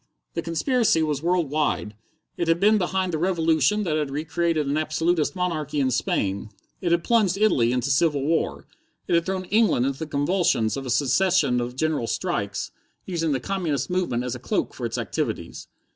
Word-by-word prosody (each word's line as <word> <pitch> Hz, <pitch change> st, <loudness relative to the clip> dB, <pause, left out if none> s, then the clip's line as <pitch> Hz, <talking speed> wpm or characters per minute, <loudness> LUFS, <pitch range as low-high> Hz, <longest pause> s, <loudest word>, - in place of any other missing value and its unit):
The -, -, -2 dB
conspiracy 200 Hz, -, +1 dB
was 150 Hz, -3 st, -1 dB
world 170 Hz, -3 st, +1 dB
wide. 145 Hz, -8 st, 0 dB, 0.4 s
It 170 Hz, -, -2 dB
had 165 Hz, +1 st, +3 dB
been 210 Hz, +2 st, +4 dB
behind 185 Hz, -1 st, -1 dB
the 155 Hz, -, -1 dB
revolution 165 Hz, +2 st, +2 dB
that 155 Hz, -5 st, 0 dB
had 150 Hz, -2 st, -1 dB
recreated 160 Hz, +2 st, -1 dB
an 140 Hz, +1 st, -1 dB
absolutist 155 Hz, +1 st, 0 dB
monarchy 155 Hz, -5 st, -2 dB
in 130 Hz, -2 st, +2 dB
Spain. 100 Hz, -4 st, -1 dB, 0.3 s
It 175 Hz, -, 0 dB
had 170 Hz, 0 st, +2 dB
plunged 210 Hz, -6 st, +2 dB
Italy 135 Hz, -, +3 dB
into 125 Hz, +2 st, 0 dB
civil 145 Hz, 0 st, +2 dB
war. 165 Hz, +2 st, -1 dB, 0.4 s
It -, -, 0 dB
had 170 Hz, +1 st, +2 dB
thrown 190 Hz, -1 st, -2 dB
England 200 Hz, -, +3 dB
into 135 Hz, 0 st, -2 dB
the 160 Hz, -, -4 dB
convulsions 145 Hz, -, +1 dB
of 135 Hz, -1 st, -5 dB
a -, -, -4 dB
succession 140 Hz, +1 st, +2 dB
of 120 Hz, +1 st, -4 dB
general 150 Hz, -4 st, 0 dB
strikes, -, -, -2 dB, 0.3 s
using 165 Hz, -4 st, -1 dB
the 135 Hz, -, 0 dB
communist 170 Hz, -2 st, -2 dB
movement 175 Hz, -10 st, 0 dB
as 125 Hz, -1 st, -3 dB
a 125 Hz, -, -6 dB
cloak 120 Hz, -, -2 dB
for -, -, -3 dB
its -, -, -5 dB
activities. -, -, -4 dB
160 Hz, 185 wpm, -24 LUFS, 140-180 Hz, 0.4 s, been